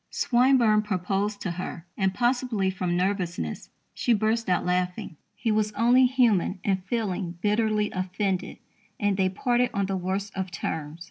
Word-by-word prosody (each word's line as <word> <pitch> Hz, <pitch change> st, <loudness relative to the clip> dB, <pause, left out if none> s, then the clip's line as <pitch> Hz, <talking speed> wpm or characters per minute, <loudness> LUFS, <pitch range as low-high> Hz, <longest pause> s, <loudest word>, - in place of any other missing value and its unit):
Swinburne 240 Hz, -4 st, +3 dB
proposed 200 Hz, +1 st, -2 dB
to 180 Hz, -, -2 dB
her, 175 Hz, -1 st, -6 dB
and, 190 Hz, -1 st, +1 dB
possibly 240 Hz, -3 st, 0 dB
from 180 Hz, -2 st, -1 dB
nervousness, 180 Hz, -, -2 dB, 0.2 s
she 240 Hz, -, +1 dB
burst 220 Hz, +1 st, 0 dB
out 180 Hz, -, +1 dB
laughing. 180 Hz, -2 st, -1 dB, 0.2 s
He 230 Hz, -, -1 dB
was 215 Hz, 0 st, +1 dB
only 240 Hz, +4 st, +5 dB
human 230 Hz, -8 st, +2 dB
in 195 Hz, -2 st, +2 dB
feeling 190 Hz, -3 st, -3 dB
bitterly 210 Hz, +1 st, +1 dB
offended, 185 Hz, 0 st, -2 dB, 0.4 s
and 205 Hz, -2 st, +1 dB
"they 190 Hz, -1 st, +2 dB
parted 245 Hz, +5 st, +1 dB
on 200 Hz, 0 st, +1 dB
the 195 Hz, 0 st, -2 dB
worst 190 Hz, +2 st, -3 dB
of 190 Hz, -1 st, -3 dB
terms." 160 Hz, -2 st, -4 dB
200 Hz, 150 wpm, -26 LUFS, 185-220 Hz, 0.4 s, only